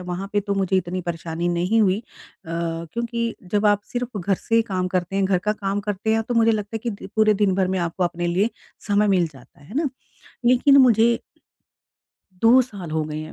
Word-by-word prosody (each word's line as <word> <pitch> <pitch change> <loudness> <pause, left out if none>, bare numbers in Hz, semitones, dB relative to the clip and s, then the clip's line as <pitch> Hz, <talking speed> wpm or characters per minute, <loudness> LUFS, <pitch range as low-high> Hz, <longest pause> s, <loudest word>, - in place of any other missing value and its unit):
वहाँ 180 +2 -5
पे 205 - +2
तो 200 0 -2
मुझे 195 -1 +1
इतनी 185 0 -2
परेशानी 170 0 -3
नहीं 180 +6 +1
हुई। 195 -1 +3
अ, - - -27 0.4
क्योंकि 170 +9 -3 0.2
जब 210 +1 +2
आप 205 0 +3
सिर्फ़ 245 -3 -3
घर 195 +2 +1
से 230 +5 +1
काम 185 -4 -2
करते 185 +1 -2
हैं, 195 - +2
घर 190 -1 +2
का 210 +4 0
काम 200 -1 -2
करते 210 +2 -1
हैं, 225 - +1
तो 240 +2 -4
मुझे 230 0 +4
लगता 210 +1 -3
है - - -2
कि 200 - -8
पूरे 215 -1 +4
दिन 200 -2 +2
भर 185 -1 +1
में 190 0 0
आपको 175 +1 -1
अपने 175 0 -2
लिए 190 +6 +1 0.4
समय 205 0 +3
मिल 185 -3 +3
जाता 135 0 -18
है। 145 - -17
है 210 - -12
ना? 305 0 +1 0.6
लेकिन 255 +3 +5
मुझे 235 -2 +5 1.2
2 235 +3 +7
साल 200 -9 -8
हो 160 0 0
गए 150 0 -5
हैं, 155 0 -7
195 Hz, 215 wpm, -22 LUFS, 175-220 Hz, 1.2 s, 2